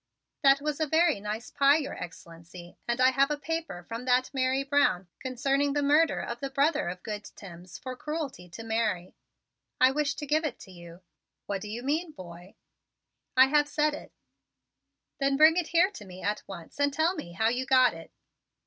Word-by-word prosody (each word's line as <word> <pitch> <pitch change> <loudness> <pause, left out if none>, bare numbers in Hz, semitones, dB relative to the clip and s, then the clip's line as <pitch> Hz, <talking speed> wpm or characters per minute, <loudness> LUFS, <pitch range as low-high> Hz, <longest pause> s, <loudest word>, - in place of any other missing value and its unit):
"That 275 -1 +5
was 300 0 -2
a 315 - 0
very 320 -4 +3
nice 210 +3 -5
pie, 280 +2 +4
Your 295 -3 -4
Excellency, 170 0 -11
and 235 +1 -1
I 255 0 +5
have 275 +2 +3
a 295 - -1
paper 325 - -4
from 230 +6 -7
that 255 +1 +2
Mary 265 0 +1
Brown 275 -10 +2
concerning 275 +2 0
the 290 0 0
murder 300 +3 +3
of 235 0 -5
the 275 - -4
brother 285 - +1
of 180 0 -8
good 210 -1 -5
Timms 180 -2 -11
for 255 0 -7
cruelty 285 - -5
to 225 +7 -9
Mary. 220 -5 -1 0.7
I 255 +1 +6
wish 285 0 -1
to 295 - -6
give 305 +3 +1
it 300 -6 -3
to 190 - -12
you." 170 0 -13 0.4
"What 200 -1 -3
do 210 - -7
you 235 +3 -5
mean, 310 +4 -1
boy?" 175 -1 -12 0.8
"I 260 +1 +7
have 295 0 +3
said 300 +1 +1
it." 300 - -9 1.1
"Then 275 0 +1
bring 310 +2 +7
it 355 -3 0
here 345 +3 +3
to 220 - -10
me 185 -1 -11
at 210 +1 -1
once 185 - -10
and 285 0 +2
tell 320 +5 +1
me 235 - -8
how 220 +5 +2
you 250 +2 -2
got 255 -2 +5
it." 165 0 -11
260 Hz, 195 wpm, -28 LUFS, 200-295 Hz, 1.1 s, I